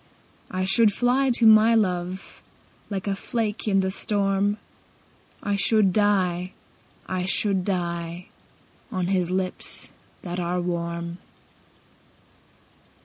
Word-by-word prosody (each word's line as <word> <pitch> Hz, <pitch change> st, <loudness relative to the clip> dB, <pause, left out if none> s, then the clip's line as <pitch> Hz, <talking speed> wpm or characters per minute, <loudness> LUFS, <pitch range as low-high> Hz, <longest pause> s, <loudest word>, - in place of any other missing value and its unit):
I 185 Hz, 0 st, -2 dB
should 215 Hz, +3 st, +6 dB
fly 250 Hz, +5 st, +2 dB
to 235 Hz, -1 st, +2 dB
my 220 Hz, +1 st, +7 dB
love 185 Hz, -3 st, -2 dB, 0.5 s
Like 195 Hz, -3 st, -4 dB
a 200 Hz, -1 st, -1 dB
flake 220 Hz, +1 st, -3 dB
in 195 Hz, -2 st, +3 dB
the 190 Hz, 0 st, -1 dB
storm, 200 Hz, 0 st, 0 dB, 0.9 s
I 205 Hz, -1 st, 0 dB
should 200 Hz, -1 st, +3 dB
die, 185 Hz, -3 st, +1 dB, 0.5 s
I 185 Hz, -1 st, -3 dB
should 195 Hz, 0 st, +2 dB
die, 170 Hz, -2 st, -3 dB, 0.7 s
On 185 Hz, -1 st, -1 dB
his 180 Hz, -3 st, +1 dB
lips 185 Hz, 0 st, -3 dB, 0.3 s
that 180 Hz, 0 st, -4 dB
are 175 Hz, +1 st, -1 dB
warm. 170 Hz, 0 st, -4 dB
190 Hz, 110 wpm, -24 LUFS, 180-205 Hz, 0.9 s, my